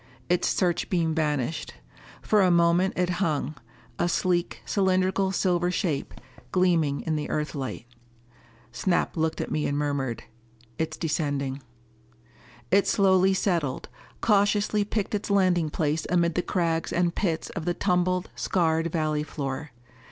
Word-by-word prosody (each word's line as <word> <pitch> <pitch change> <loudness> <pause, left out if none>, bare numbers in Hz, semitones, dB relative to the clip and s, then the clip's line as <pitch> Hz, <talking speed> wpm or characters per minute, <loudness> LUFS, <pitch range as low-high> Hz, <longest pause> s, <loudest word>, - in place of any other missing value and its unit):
Its 180 0 +2
searchbeam 175 -2 +1
vanished. 150 - -1 0.5
For 210 -1 +3
a 185 - +4
moment 170 +2 +3
it 180 0 +1
hung, 155 -4 0 0.5
a 175 - +2
sleek, 170 -12 0
cylindrical 190 - +1
silver 180 -2 +1
shape, 170 -6 -2 0.4
gleaming 170 -6 +2
in 155 -1 -1
the 150 - -4
Earthlight. 145 -5 -3 0.9
Snap 175 +9 0
looked 160 -1 -1
at - - -5
me 155 - 0
and 145 - -1
murmured, 140 -5 -2 0.6
"It's 160 0 -2
descending." 145 -4 -2 1.1
It 200 +1 +4
slowly 190 -1 +4
settled, 170 -9 -1 0.3
cautiously 205 0 +2
picked 210 0 -3
its 210 0 -2
landing 185 -5 +3
place 155 +1 -1
amid 170 -1 +2
the 180 - +1
crags 170 -3 -1
and 175 -1 +1
pits 170 -5 -2
of 170 -4 -5
the 175 -1 0
tumbled, 180 -1 0
scarred 165 -2 +1
valley 155 -2 0
floor. 145 -1 -4
170 Hz, 130 wpm, -26 LUFS, 150-185 Hz, 1.1 s, a